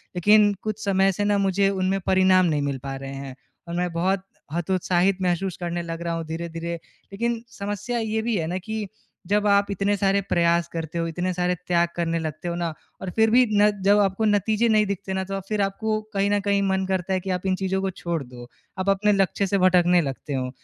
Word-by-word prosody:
लेकिन 205 Hz, +3 st, +5 dB
कुछ 215 Hz, 0 st, -4 dB
समय 195 Hz, 0 st, +3 dB
से 205 Hz, +2 st, -2 dB
न 205 Hz, 0 st, +2 dB
मुझे 195 Hz, 0 st, +2 dB
उनमें 195 Hz, 0 st, 0 dB
परिणाम 185 Hz, -1 st, +5 dB
नहीं 150 Hz, -3 st, +1 dB
मिल 140 Hz, -1 st, -2 dB
पा 135 Hz, -1 st, -4 dB
रहे 135 Hz, 0 st, -7 dB
हैं 135 Hz, -1 st, -7 dB, 0.3 s
और 170 Hz, -, -6 dB
मैं 180 Hz, 0 st, -1 dB
बहुत 185 Hz, +3 st, 0 dB, 0.3 s
हतोत्साहित 180 Hz, +2 st, +1 dB
महसूस 180 Hz, 0 st, -1 dB
करने 175 Hz, -1 st, -3 dB
लग 165 Hz, 0 st, -6 dB
रहा 170 Hz, 0 st, -2 dB
हूँ 165 Hz, -1 st, -3 dB
धीरे-धीरे। 165 Hz, +1 st, -4 dB, 0.4 s
लेकिन 235 Hz, +2 st, -2 dB, 0.2 s
समस्या 205 Hz, +4 st, -3 dB
ये 220 Hz, 0 st, -1 dB
भी 230 Hz, -1 st, -1 dB
है 160 Hz, -2 st, -1 dB
न -, -, 0 dB
कि 220 Hz, -1 st, -3 dB, 0.4 s
जब 210 Hz, +1 st, +2 dB
आप 200 Hz, 0 st, +4 dB
इतने 200 Hz, +1 st, +1 dB
सारे 195 Hz, 0 st, +2 dB
प्रयास 170 Hz, 0 st, +2 dB
करते 165 Hz, 0 st, -4 dB
हो 165 Hz, -, 0 dB
इतने 175 Hz, +3 st, -2 dB
सारे 180 Hz, 0 st, 0 dB
त्याग 175 Hz, -1 st, +3 dB
करने 165 Hz, -1 st, -1 dB
लगते 155 Hz, +1 st, -5 dB
हो 170 Hz, -, -2 dB
न 175 Hz, -, -2 dB, 0.4 s
और 190 Hz, -, -4 dB
फ़िर 225 Hz, 0 st, +4 dB
भी 250 Hz, +1 st, +6 dB
न 210 Hz, -, +6 dB
जब 205 Hz, +1 st, +5 dB
आपको 195 Hz, +2 st, +1 dB
नतीजे 215 Hz, +2 st, +2 dB
नहीं 215 Hz, -1 st, +4 dB
दिखते 200 Hz, -1 st, -4 dB
न 190 Hz, -, -1 dB
तो 195 Hz, +1 st, -4 dB
अ, -, -, -2 dB
फ़िर 210 Hz, -1 st, 0 dB
आपको 215 Hz, +2 st, -1 dB
कहीं 200 Hz, 0 st, +1 dB
न 205 Hz, -, +3 dB
कहीं 200 Hz, 0 st, +3 dB
मन 190 Hz, 0 st, +1 dB
करता 190 Hz, 0 st, -1 dB
है 185 Hz, -, +1 dB
कि 190 Hz, +1 st, -7 dB
आप 180 Hz, 0 st, -2 dB
इन 185 Hz, -, +2 dB
चीज़ों 190 Hz, 0 st, -1 dB
को 195 Hz, -, -1 dB
छोड़ 170 Hz, -4 st, -2 dB
दो। 125 Hz, -1 st, -11 dB, 0.3 s
आप 185 Hz, +1 st, 0 dB
अपने 200 Hz, +2 st, +3 dB
लक्ष्य 195 Hz, 0 st, +1 dB
से 200 Hz, -, +1 dB
भटकने 180 Hz, -1 st, +4 dB
लगते 140 Hz, 0 st, -5 dB
हो। 130 Hz, -1 st, -2 dB
190 Hz, 225 wpm, -24 LUFS, 170-200 Hz, 0.4 s, भी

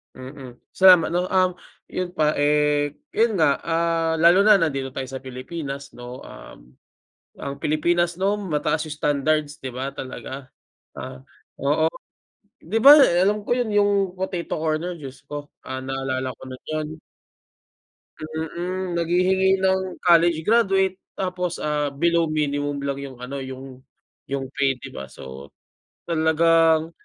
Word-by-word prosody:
Mm. 130 Hz, -1 st, -10 dB, 0.2 s
Sa 190 Hz, -1 st, +8 dB
ma 165 Hz, -2 st, -2 dB
ano, 180 Hz, +1 st, 0 dB
um, 185 Hz, -1 st, +2 dB, 0.4 s
yun 185 Hz, -1 st, -2 dB
pa, 155 Hz, -1 st, +3 dB
eh, 145 Hz, 0 st, +2 dB, 0.2 s
'yon 225 Hz, -1 st, +2 dB
nga, 155 Hz, -6 st, +3 dB
ah, 165 Hz, 0 st, 0 dB
lalo 170 Hz, +4 st, +5 dB
na 215 Hz, -1 st, +8 dB
nandito 140 Hz, -7 st, 0 dB
tayo 130 Hz, -, -4 dB
sa 135 Hz, -, -6 dB
Pilipinas, 140 Hz, +2 st, -6 dB
'no? 125 Hz, +1 st, -10 dB
Um, -, -, -13 dB, 0.7 s
ang 140 Hz, -, -5 dB
Pilipinas 170 Hz, +3 st, +1 dB
'no, 200 Hz, +3 st, 0 dB
mataas 155 Hz, -4 st, -1 dB
yung 150 Hz, -, -6 dB
standards, 145 Hz, 0 st, 0 dB
'di 130 Hz, -, -6 dB
ba? 130 Hz, +2 st, -4 dB
Talaga. 130 Hz, 0 st, -8 dB, 0.5 s
Ah, 130 Hz, 0 st, -8 dB, 0.4 s
oo. 150 Hz, +3 st, +2 dB, 0.8 s
'Di 210 Hz, +8 st, -1 dB
ba, 285 Hz, +3 st, +10 dB
eh, 175 Hz, -8 st, +4 dB
alam 205 Hz, +2 st, +1 dB
ko -, -, +1 dB
'yon 245 Hz, -2 st, -1 dB
'yong 205 Hz, 0 st, +4 dB, 0.3 s
Potato 185 Hz, -2 st, -3 dB
Corner, 160 Hz, +3 st, -1 dB
Diyos 135 Hz, -4 st, -10 dB
ko, 145 Hz, 0 st, -6 dB, 0.2 s
ah, 130 Hz, 0 st, -4 dB
naalala 130 Hz, -1 st, -3 dB
ko -, -, -27 dB
din 130 Hz, -, -10 dB
'yon. 155 Hz, -1 st, -2 dB, 1.3 s
Mm, 170 Hz, +3 st, -4 dB
naghihingi 190 Hz, +3 st, +2 dB
ng 190 Hz, 0 st, 0 dB
college 170 Hz, -2 st, +4 dB
graduate 195 Hz, -2 st, +2 dB, 0.2 s
tapos, 180 Hz, -2 st, -3 dB
ah, 150 Hz, -2 st, -1 dB
below 170 Hz, +3 st, +2 dB
minimum 145 Hz, -2 st, -1 dB
lang 140 Hz, -1 st, -2 dB
'yong 140 Hz, -2 st, -8 dB
ano 135 Hz, +3 st, -5 dB
'yong 130 Hz, -1 st, -8 dB, 0.5 s
'yong 135 Hz, -1 st, -2 dB
pay, 140 Hz, -1 st, +2 dB
'di -, -, -9 dB
ba? 65 Hz, -, -7 dB
So, 65 Hz, +1 st, -11 dB, 0.5 s
talagang, 165 Hz, 0 st, +3 dB
155 Hz, 145 wpm, -23 LUFS, 140-180 Hz, 1.3 s, ba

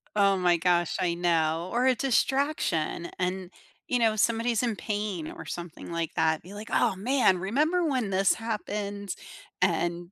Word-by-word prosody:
Oh 200 Hz, -1 st, +4 dB
my 175 Hz, -2 st, +3 dB
gosh, 175 Hz, 0 st, +1 dB
I 180 Hz, -2 st, +1 dB
know. 170 Hz, 0 st, +1 dB
Or 245 Hz, +2 st, +1 dB
a 260 Hz, -1 st, +4 dB
distraction. 265 Hz, -, 0 dB
And, 185 Hz, 0 st, -2 dB, 0.4 s
you 250 Hz, -, +1 dB
know, 225 Hz, -2 st, +3 dB
somebody's 230 Hz, +1 st, +2 dB
in 235 Hz, -3 st, 0 dB
pain 205 Hz, -7 st, -3 dB
or -, -, -9 dB
something 175 Hz, -1 st, -7 dB
like 170 Hz, -1 st, -2 dB
that, 160 Hz, -1 st, +2 dB
be 185 Hz, +4 st, -12 dB
like, 210 Hz, +2 st, -8 dB
"Oh, -, -, +2 dB
man. 240 Hz, -3 st, +3 dB
Remember 300 Hz, -, +1 dB
when 255 Hz, -8 st, 0 dB
this 195 Hz, +1 st, +3 dB
happens?" 205 Hz, -3 st, -4 dB, 0.5 s
And, 175 Hz, 0 st, 0 dB
195 Hz, 160 wpm, -27 LUFS, 175-230 Hz, 0.5 s, Oh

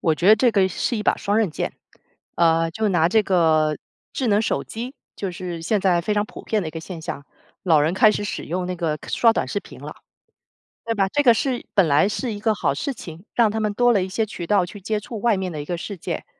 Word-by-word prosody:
我 160 Hz, -, +2 dB
觉 175 Hz, +5 st, +1 dB
得 215 Hz, -, +8 dB
这 245 Hz, +2 st, +3 dB
个 195 Hz, -3 st, +3 dB
是 235 Hz, +5 st, -2 dB
一 210 Hz, -, -2 dB
把 -, -, +2 dB
双 205 Hz, +1 st, -1 dB
刃 215 Hz, -5 st, +1 dB
剑。 -, -, -3 dB, 0.6 s
呃， 165 Hz, -1 st, +3 dB
就 215 Hz, +5 st, -1 dB
拿 175 Hz, -3 st, +3 dB
这 220 Hz, +3 st, +3 dB
个 160 Hz, -5 st, +2 dB, 0.4 s
智 260 Hz, -, -2 dB
能 210 Hz, +1 st, +3 dB
手 -, -, -1 dB
机， 245 Hz, +5 st, -7 dB, 0.2 s
就 195 Hz, -2 st, -3 dB
是 175 Hz, -2 st, -6 dB
现 205 Hz, +4 st, +1 dB
在 180 Hz, -3 st, +3 dB
非 210 Hz, +5 st, -2 dB
常 205 Hz, 0 st, +1 dB
普 -, -, -11 dB
遍 215 Hz, -2 st, 0 dB
的 160 Hz, -, -4 dB
一 -, -, -6 dB
个 165 Hz, -, -6 dB
现 170 Hz, 0 st, -8 dB
象， 140 Hz, -3 st, -6 dB, 0.4 s
老 160 Hz, -5 st, +4 dB
人 160 Hz, +5 st, +1 dB
开 215 Hz, +2 st, +6 dB
始 205 Hz, -, -3 dB
使 -, -, -4 dB
用 180 Hz, +2 st, -3 dB
那 180 Hz, 0 st, -3 dB
个 160 Hz, -3 st, -2 dB
刷 230 Hz, -1 st, +4 dB
短 -, -, -2 dB
视 205 Hz, -, -1 dB
频 -, -, -13 dB
了， -, -, -8 dB, 0.9 s
对 230 Hz, -, 0 dB
吧？ 195 Hz, -3 st, +1 dB
这 290 Hz, +5 st, +1 dB
个 240 Hz, -3 st, +7 dB
是 250 Hz, +1 st, -2 dB
本 190 Hz, -5 st, +4 dB
来 145 Hz, +7 st, +4 dB
是 230 Hz, +3 st, -3 dB
一 205 Hz, -, -6 dB
个 220 Hz, +1 st, +1 dB
好 185 Hz, -, 0 dB
事 275 Hz, -, -3 dB
情， 170 Hz, -3 st, -11 dB
让 230 Hz, -3 st, +4 dB
他 220 Hz, +1 st, -2 dB
们 210 Hz, -1 st, -1 dB
多 245 Hz, +2 st, +3 dB
了 200 Hz, -5 st, +2 dB
一 185 Hz, -, -5 dB
些 220 Hz, +4 st, 0 dB
渠 180 Hz, -5 st, -7 dB
道 195 Hz, -1 st, +2 dB
去 200 Hz, +3 st, -10 dB
接 210 Hz, +2 st, -2 dB
触 210 Hz, +1 st, -7 dB
外 235 Hz, -2 st, +2 dB
面 190 Hz, -1 st, -3 dB
的 150 Hz, -3 st, -5 dB
一 -, -, -8 dB
个 175 Hz, +3 st, -3 dB
世 195 Hz, +2 st, -6 dB
界。 -, -, -5 dB
195 Hz, 285 characters per minute, -22 LUFS, 170-220 Hz, 0.9 s, 得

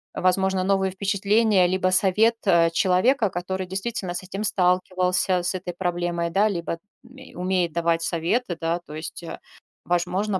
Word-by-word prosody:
возможно, 190 Hz, +1 st, +1 dB
новые 190 Hz, 0 st, +1 dB
впечатления 200 Hz, 0 st, +2 dB
либо 185 Hz, +1 st, +1 dB
совет, 200 Hz, +5 st, +3 dB
э, 170 Hz, -2 st, +4 dB
человека, 200 Hz, +7 st, +2 dB
который 185 Hz, +1 st, -4 dB
действительно 195 Hz, -1 st, -4 dB
с 180 Hz, -, -4 dB
этим 195 Hz, +3 st, -5 dB
сталкивался, 185 Hz, -1 st, +1 dB
с 180 Hz, -, 0 dB
этой 180 Hz, -1 st, -5 dB
проблемой, 175 Hz, -1 st, -2 dB
да? 200 Hz, +5 st, +3 dB
Либо 170 Hz, -3 st, -4 dB, 0.2 s
ме 260 Hz, +2 st, -15 dB
умеет 180 Hz, -1 st, 0 dB
давать 170 Hz, -1 st, +1 dB
советы, 175 Hz, +4 st, -1 dB
да? 165 Hz, +1 st, -1 dB
То 155 Hz, -3 st, -12 dB
есть, 155 Hz, +2 st, -7 dB
э, 165 Hz, -, -7 dB, 0.5 s
возможно, 180 Hz, +3 st, 0 dB
185 Hz, 150 wpm, -24 LUFS, 175-195 Hz, 0.5 s, э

